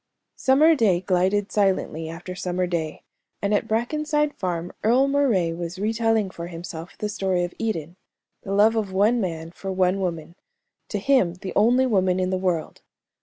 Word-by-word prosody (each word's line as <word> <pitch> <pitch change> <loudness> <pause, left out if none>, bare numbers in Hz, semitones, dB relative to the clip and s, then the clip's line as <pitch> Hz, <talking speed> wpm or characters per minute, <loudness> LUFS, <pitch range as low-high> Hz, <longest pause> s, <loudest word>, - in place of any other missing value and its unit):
Summer 295 +5 +5
day 205 - +2
glided 190 +2 +1
silently 185 -5 0
after 175 +2 -7
summer 180 0 -2
day, 165 -3 -3 0.4
and 200 +1 0
at 205 - +1
Brackenside 295 +6 0
Farm 175 -2 -3
Earle 250 +5 +4
Moray 245 -12 +2
was 170 +2 -5
re 210 +3 -1
telling 225 -3 +1
for 170 -2 -7
himself 170 0 -8
the 210 - -2
story 190 -4 -1
of 175 - -4
Eden 175 -6 -3 0.4
the 195 - -7
love 215 +3 +5
of 210 -4 -1
one 210 +5 +3
man 165 -3 -4
for 195 +2 -6
one 185 0 +1
woman, 170 -3 -3 0.6
to 210 - -2
him 200 -6 +2
the 185 0 -7
only 245 +5 +4
woman 185 -6 +2
in 185 0 0
the 185 - 0
world. 180 -4 -2
190 Hz, 170 wpm, -24 LUFS, 175-225 Hz, 0.6 s, Summer